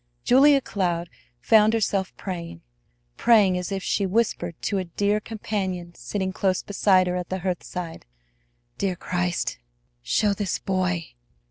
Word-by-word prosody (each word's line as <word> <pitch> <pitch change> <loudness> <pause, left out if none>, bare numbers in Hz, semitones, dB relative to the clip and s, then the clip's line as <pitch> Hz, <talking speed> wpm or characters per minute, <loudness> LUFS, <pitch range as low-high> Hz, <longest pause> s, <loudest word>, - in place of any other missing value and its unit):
Julia 275 +2 +6
Cloud 175 -6 -2 0.3
found 215 - +5
herself 200 -4 0
praying; 170 - -6 0.5
praying, 210 -6 +5
as 180 +1 -3
if 195 -1 -3
she 200 - 0
whispered 185 -5 -1
to 200 - 0
a 185 - -3
dear 205 +5 0
Companion 190 -5 -4
sitting 185 +9 -3
close 190 -1 0
beside 190 -2 +3
her 180 0 -1
at 180 -1 -4
the 185 0 -3
hearthside: 180 - -4 0.7
"Dear 190 -2 0
Christ, 175 - -2 0.4
show 200 - +1
this 200 -2 -2
boy. 185 -3 -1
190 Hz, 135 wpm, -24 LUFS, 175-205 Hz, 0.7 s, Julia